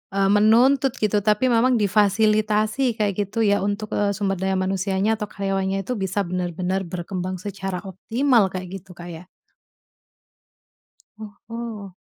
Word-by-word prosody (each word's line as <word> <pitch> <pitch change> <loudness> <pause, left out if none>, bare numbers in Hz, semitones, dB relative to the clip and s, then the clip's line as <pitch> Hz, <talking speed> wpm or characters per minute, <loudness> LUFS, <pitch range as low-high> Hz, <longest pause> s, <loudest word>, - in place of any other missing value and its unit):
eee, 195 0 +3
menuntut 250 +6 +4
gitu 210 0 +2
tapi 215 +4 +3
memang 245 +2 +3
difasilitasi 215 +4 +2
kayak 210 -2 0
gitu 215 +4 -11
ya 205 - +3
untuk, 205 +2 -3
eee, 200 -1 0
sumber 195 -1 -1
daya 190 0 0
manusianya 190 +2 0
atau 210 - -3
karyawannya 195 -1 -2
itu 250 - -3
bisa 190 +2 -2
benar-benar 180 +1 -2
berkembang 180 +1 -4
secara 195 -2 -4
optimal, 225 +4 +1
kayak 185 -1 -6
gitu 190 +1 -18
Kak 175 0 -9
ya? 165 +2 -10 2.2
Oho. 225 -5 -7
200 Hz, 135 wpm, -23 LUFS, 190-215 Hz, 2.2 s, menuntut